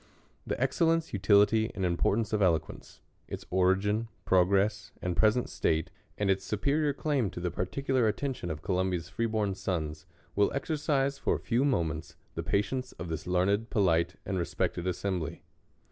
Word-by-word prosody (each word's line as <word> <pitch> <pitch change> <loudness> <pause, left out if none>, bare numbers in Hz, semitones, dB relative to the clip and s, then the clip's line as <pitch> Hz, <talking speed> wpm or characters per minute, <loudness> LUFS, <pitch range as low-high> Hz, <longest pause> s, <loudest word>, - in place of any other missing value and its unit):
THE - - -2
excellence, 165 +5 +1
utility, 105 +2 +4
and 95 - -1
importance 100 +5 +1
of 105 - +1
Elo 90 -4 +5
quence; - - -12 0.3
its - - -6
origin, 95 +4 +2 0.2
progress, 95 +2 +2
and 90 -1 -2
present 110 +5 +3
state; 80 -1 0 0.3
and 105 - 0
its 95 0 +2
superior 140 +10 +1
claim 140 -6 0
to - - -7
the 90 0 -2
particular 125 +7 0
attention 125 -4 -2
of 80 -1 -5
Columbia's 90 -3 -1
free 115 - -1
born 105 -3 0
sons, 80 -3 -3 0.3
will 100 0 +3
exercise 140 -2 0
for - - +1
a. - - -4
few 120 +3 +1
mo 135 -11 +2
ments 80 0 -5 0.2
the 80 - -3
patience 105 +8 -1
of 80 +1 -7
this 80 +2 -4
learned, 100 +5 +1
polite, 85 -5 +2
and 95 -1 -1
respected 85 +1 -2
assembly. 90 -2 -2
100 Hz, 160 wpm, -30 LUFS, 90-115 Hz, 0.3 s, Elo